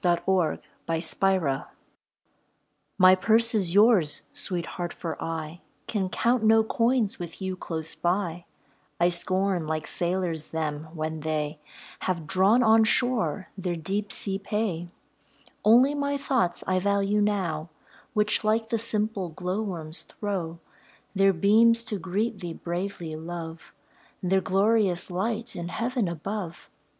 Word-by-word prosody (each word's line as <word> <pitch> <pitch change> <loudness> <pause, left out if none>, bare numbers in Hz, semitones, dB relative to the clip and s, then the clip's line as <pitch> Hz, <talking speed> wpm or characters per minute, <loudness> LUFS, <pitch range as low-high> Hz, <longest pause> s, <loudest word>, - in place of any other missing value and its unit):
A 175 -1 +3
WOMAN'S 165 -2 -1
CHARMS 185 -9 +1 1.3
My 185 -1 +8
purse 225 +5 +3
is 190 -5 0
yours, 205 -8 +4
Sweet 190 -12 -1
Heart, 175 0 -5
for 165 -2 -5
I 165 +1 -5 0.2
Can 195 -4 -1
count 235 +5 +1
no 220 0 +6
coins 230 -1 +1
with 170 -2 -7
you 190 -1 -3
close 160 -3 -5
by; 175 -1 -1 0.5
I 175 +1 +4
scorn 185 0 0
like 155 -1 -2
sailors 175 -3 -1
them, 155 -1 -3
when 155 0 -3
they 155 -1 -2 0.4
Have 170 -4 -2
drawn 195 +8 +4
on 220 0 +6
shore 220 - +1
their 180 -3 -2
deep 195 +5 -2
sea 195 -1 -1
pay; 195 -5 -2 0.7
Only 245 +6 +6
my 285 -1 -1
thoughts 260 -10 0
I 185 0 +1
value 200 +1 +1
now, 180 -6 -1 0.5
Which, 210 +1 +1
like 220 +1 +1
the 230 - 0
simple 215 -4 -1
glowworms, 180 -2 -4
throw 180 -6 -4 0.6
Their 195 0 +4
beams 225 +6 +4
to 215 -3 -3
greet 200 +4 -2
thee 175 -3 -5
bravely, 175 0 -4
Love 165 0 -7 0.5
Their 190 +1 +2
glorious 195 -2 +2
light 220 +6 -2
in 170 0 -4
Heaven 235 +3 -1
above. 170 +1 -5
190 Hz, 130 wpm, -26 LUFS, 170-215 Hz, 1.3 s, My